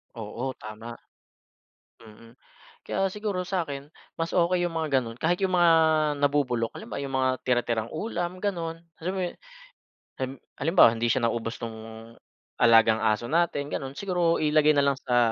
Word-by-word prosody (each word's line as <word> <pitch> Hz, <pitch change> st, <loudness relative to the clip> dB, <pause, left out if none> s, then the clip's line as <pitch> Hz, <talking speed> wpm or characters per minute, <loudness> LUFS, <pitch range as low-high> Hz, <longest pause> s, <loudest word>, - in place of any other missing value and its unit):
Oo, 115 Hz, +4 st, -5 dB
tama, 110 Hz, +2 st, -8 dB, 1.1 s
mm. 115 Hz, +2 st, -16 dB, 0.5 s
Kaya 195 Hz, 0 st, 0 dB
siguro 205 Hz, -2 st, -3 dB
sa 180 Hz, -2 st, -1 dB
'kin, 140 Hz, +1 st, -7 dB, 0.3 s
mas 165 Hz, 0 st, -2 dB
okey 175 Hz, 0 st, +2 dB
yung 175 Hz, -, -2 dB
mga 155 Hz, -4 st, 0 dB
ganun 115 Hz, 0 st, -8 dB
kahit 175 Hz, +2 st, +1 dB
yung 190 Hz, -, +1 dB
mga 175 Hz, -1 st, +6 dB, 0.5 s
nabubulok, 130 Hz, -5 st, +1 dB
halimbawa 120 Hz, +5 st, -6 dB
yung 135 Hz, -1 st, -3 dB
mga 130 Hz, -, +3 dB
tira-tirang 120 Hz, -3 st, 0 dB
ulam 175 Hz, 0 st, -3 dB
ganon. 170 Hz, -5 st, -3 dB, 0.2 s
Alam 180 Hz, +3 st, -1 dB
mo -, -, -1 dB
yun -, -, -11 dB, 0.9 s
ehm 130 Hz, 0 st, -2 dB, 0.3 s
halimbawa, 165 Hz, -7 st, +6 dB
hindi 115 Hz, +1 st, 0 dB
siya 130 Hz, -, 0 dB
naubos 115 Hz, 0 st, -4 dB
nung 115 Hz, -1 st, -5 dB, 0.8 s
alagang 115 Hz, -2 st, +6 dB
aso 110 Hz, +2 st, +1 dB
natin 160 Hz, -4 st, +1 dB
ganon. 135 Hz, 0 st, -4 dB
Siguro 175 Hz, -1 st, 0 dB
ilagay 155 Hz, 0 st, +4 dB
na 140 Hz, -, +3 dB
lang 140 Hz, -1 st, +2 dB
sa 125 Hz, -2 st, 0 dB
140 Hz, 155 wpm, -26 LUFS, 115-170 Hz, 1.1 s, mga